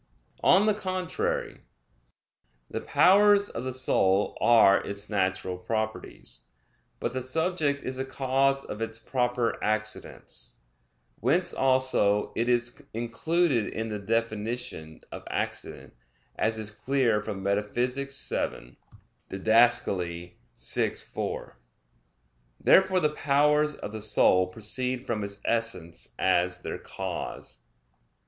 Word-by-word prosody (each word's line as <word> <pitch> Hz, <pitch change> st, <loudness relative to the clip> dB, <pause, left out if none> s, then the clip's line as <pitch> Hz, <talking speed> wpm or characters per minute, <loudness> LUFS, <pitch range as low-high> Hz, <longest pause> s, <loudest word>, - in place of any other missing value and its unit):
On 195 Hz, +3 st, +5 dB
the 215 Hz, -, +3 dB
contrary, 185 Hz, -3 st, -3 dB, 1.1 s
The -, -, -3 dB
powers 205 Hz, +1 st, +5 dB
of 115 Hz, -, -6 dB
the 130 Hz, -, -3 dB
soul 100 Hz, -6 st, +2 dB
are 110 Hz, -4 st, +6 dB
its 100 Hz, +1 st, -5 dB
natural 95 Hz, -2 st, -1 dB
properties. 110 Hz, -, -4 dB, 0.5 s
But 120 Hz, -, -3 dB
the 130 Hz, -, -2 dB
subject 150 Hz, +1 st, -1 dB
is 130 Hz, 0 st, -4 dB
the 130 Hz, -, -2 dB
cause 135 Hz, +1 st, 0 dB
of 105 Hz, -, -7 dB
its 115 Hz, 0 st, -2 dB
proper 125 Hz, 0 st, -1 dB
accidents; 110 Hz, 0 st, -3 dB, 0.6 s
whence 160 Hz, -, +2 dB
also 130 Hz, -6 st, +2 dB
it 115 Hz, +2 st, 0 dB
is 120 Hz, 0 st, 0 dB
included 120 Hz, +2 st, 0 dB
in 110 Hz, 0 st, -4 dB
the 105 Hz, -1 st, -4 dB
definition 110 Hz, -6 st, -3 dB
of -, -, -7 dB
accident, -, -, -4 dB, 0.4 s
as 110 Hz, 0 st, 0 dB
is 105 Hz, -1 st, -3 dB
clear 120 Hz, -1 st, +1 dB
from 105 Hz, -2 st, -6 dB
Metaph. 100 Hz, +1 st, 0 dB
vii 125 Hz, -, -1 dB, 0.5 s
(Did. -, -, -6 dB
vi, 90 Hz, -, +2 dB
4). -, -, -4 dB, 1.0 s
Therefore 190 Hz, -1 st, +5 dB
the 155 Hz, -4 st, +2 dB
powers 150 Hz, +1 st, +2 dB
of -, -, -7 dB
the 110 Hz, 0 st, -6 dB
soul 95 Hz, -3 st, +4 dB
proceed 125 Hz, +6 st, -2 dB
from 110 Hz, -3 st, -2 dB
its 100 Hz, 0 st, -5 dB
essence 90 Hz, -8 st, -1 dB
as 90 Hz, -1 st, +1 dB
their -, -, -5 dB
cause. -, -, -6 dB
115 Hz, 115 wpm, -27 LUFS, 105-135 Hz, 1.1 s, are